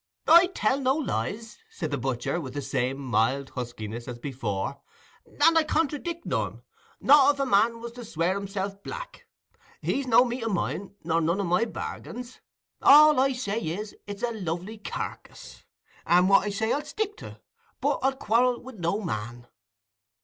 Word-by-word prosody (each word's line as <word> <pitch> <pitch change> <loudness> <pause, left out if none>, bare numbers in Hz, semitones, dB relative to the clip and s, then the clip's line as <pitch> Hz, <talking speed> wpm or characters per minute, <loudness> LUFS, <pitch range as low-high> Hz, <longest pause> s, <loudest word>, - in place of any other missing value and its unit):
"I 340 +3 +8
tell 260 +6 +1
no 265 0 +2
lies," 220 - -3
said 160 -4 -5
the 145 - 0
butcher, 130 +6 -2
with 130 -3 -8
the 145 - -2
same 130 0 -1
mild 135 +1 0
huskiness 120 -2 -6
as 125 -1 -6
before, 120 -3 -4 0.6
"and 330 +3 +6
I 325 - +5
contradick 320 +2 -2
none—not 290 0 +2
if - - -14
a 275 - +1
man 230 0 +3
was 235 0 -6
to 245 +1 -9
swear 170 -3 0
himself 200 0 -4
black: - - -8 0.5
he's 275 -1 -1
no 245 +1 +6
meat 240 0 -4
o' 225 - -1
mine, 200 +1 -3
nor 165 +1 +1
none 170 +4 +1
o' - - 0
my 180 +5 +2
bargains. 245 +2 -7 0.4
All 300 0 +8
I 270 +1 +3
say 225 -4 -2
is, 205 +4 -4
it's 205 +2 -7
a 240 - +1
lovely 190 +1 -5
carkiss. - - -7 0.4
And 180 +2 +5
what 195 +1 +5
I - - 0
say, 220 +3 0
I'll 295 - -1
stick 420 +7 -3
to; - - -10 0.4
but 285 +2 0
I'll 270 +1 +1
quarrel 245 -1 +2
wi' 260 +1 -11
no 175 +5 -1
man." 120 - -5
205 Hz, 170 wpm, -26 LUFS, 155-260 Hz, 0.6 s, I